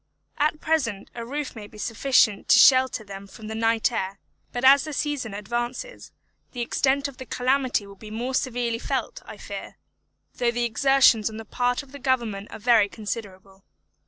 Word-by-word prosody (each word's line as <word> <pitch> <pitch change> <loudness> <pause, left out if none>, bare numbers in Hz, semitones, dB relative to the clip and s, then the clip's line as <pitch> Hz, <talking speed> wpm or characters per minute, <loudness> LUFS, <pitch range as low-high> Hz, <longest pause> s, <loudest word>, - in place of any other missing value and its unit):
At 305 +1 +1
present 255 -11 -1
a 235 - -6
roof 280 +3 -5
may 210 -2 -8
be 210 - -15
sufficient 230 -1 +2
to - - +7
shelter 260 -4 +5
them 200 -1 -9
from 215 +3 -12
the 220 - -5
night 225 +1 +1
air; 195 -3 -3 0.3
but 245 +1 -2
as 275 +1 +7
the 310 - -6
season 275 -7 -2
advances, 240 - -5 0.4
the 245 - -4
extent 275 +4 +1
of 275 -3 -11
the 260 - -8
calamity 255 -3 0
will 200 - -12
be 210 +2 -12
more 240 +4 -4
severely 245 -3 -1
felt, - - -3
I - - -9
fear, - - -8 0.6
though 240 -1 +2
the 240 0 0
exertions 235 -2 +4
on 220 - -9
the 225 - -8
part 245 +5 -1
of 280 0 -13
Government 235 -6 -1
are - - -8
very 220 -2 +4
considerable. 195 -3 -7
240 Hz, 180 wpm, -25 LUFS, 215-260 Hz, 0.6 s, to